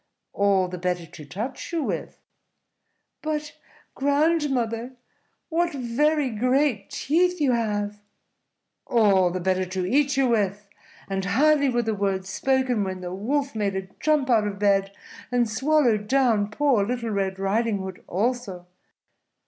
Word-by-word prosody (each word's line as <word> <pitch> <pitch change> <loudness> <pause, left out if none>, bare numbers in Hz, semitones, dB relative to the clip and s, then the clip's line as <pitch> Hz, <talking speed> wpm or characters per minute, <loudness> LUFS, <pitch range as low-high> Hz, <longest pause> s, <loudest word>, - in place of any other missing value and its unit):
"All 200 -2 +2
the 180 0 -6
better 180 -1 -2
to 165 -2 -12
touch 215 - -6
you 330 -3 -1
with." - - -4 1.0
"But, 300 -1 -3 0.4
grandmother, 275 -5 0 0.6
what 340 0 0
very 275 +3 +1
great 250 -1 +1
teeth 360 +4 +1
you 285 -4 +3
have!" 210 -3 -1 0.9
"All 200 -6 +4
the 185 +1 -3
better 185 +1 +1
to 185 0 -3
eat 280 +6 +2
you 270 -1 +3
with;" 205 -3 0 0.4
and 195 -1 -2
hardly 285 +7 +3
were 240 -1 +1
the 220 -1 -1
words 195 -2 -2
spoken 260 0 +1
when 185 -1 -4
the 180 0 -5
Wolf 275 +8 -1
made 205 -3 -1
a 190 -1 -4
jump 305 -3 +2
out 220 -4 +3
of 200 -1 -4
bed 195 -1 +2 0.4
and 245 -1 +2
swallowed 235 -2 +2
down 230 -5 +2
poor 255 -2 +2
Little 235 +1 -2
Red 195 -2 -1
Riding 205 +3 0
Hood 190 -1 -7
also. 205 -3 -2
225 Hz, 140 wpm, -25 LUFS, 195-270 Hz, 1.0 s, All